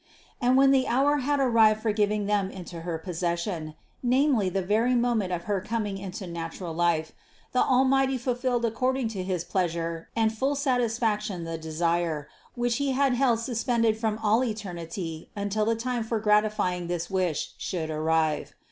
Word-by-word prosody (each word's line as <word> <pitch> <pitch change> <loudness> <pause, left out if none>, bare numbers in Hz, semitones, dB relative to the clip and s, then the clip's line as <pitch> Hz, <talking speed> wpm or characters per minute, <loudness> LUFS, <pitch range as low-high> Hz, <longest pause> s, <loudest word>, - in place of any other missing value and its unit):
And 250 +1 +4
when 270 0 +6
the 265 -1 +3
hour 275 +4 +3
had 285 +1 0
arrived 225 -4 +4
for 220 - +2
giving 210 -1 +1
them 200 -2 +1
into 180 -3 -8
her 165 -1 -3
possession, 170 -1 -3 0.3
namely 255 -5 +3
the 190 +1 -1
very 225 +6 +2
moment 235 -6 +1
of 175 -1 -2
her 200 -1 -1
coming 210 -2 -3
into 190 0 -6
natural 170 0 -5
life, 165 -1 +1 0.4
the 250 - +1
Almighty 265 +1 +3
fulfilled 245 -1 0
accord 255 +3 0
ing 245 -4 -1
to 200 -4 -4
his 180 -2 -2
pleasure 170 -2 -2
and 225 -1 +2
full 270 +5 0
satisfaction 225 - 0
the 165 0 -4
desire, 160 -1 -1 0.3
which 240 -1 0
He 280 -1 0
had 270 0 +2
held 245 -3 +2
suspended 230 -2 +1
from 220 -1 -1
all 220 +4 +3
eternity 175 -7 -5
until 205 +1 -1
the 230 +1 +2
time 240 0 -2
for 225 0 -1
gratifying 210 -4 +1
this 175 0 -2
wish 180 -5 -1
should 160 -4 -3
arrive. 155 0 0
210 Hz, 165 wpm, -27 LUFS, 175-245 Hz, 0.4 s, when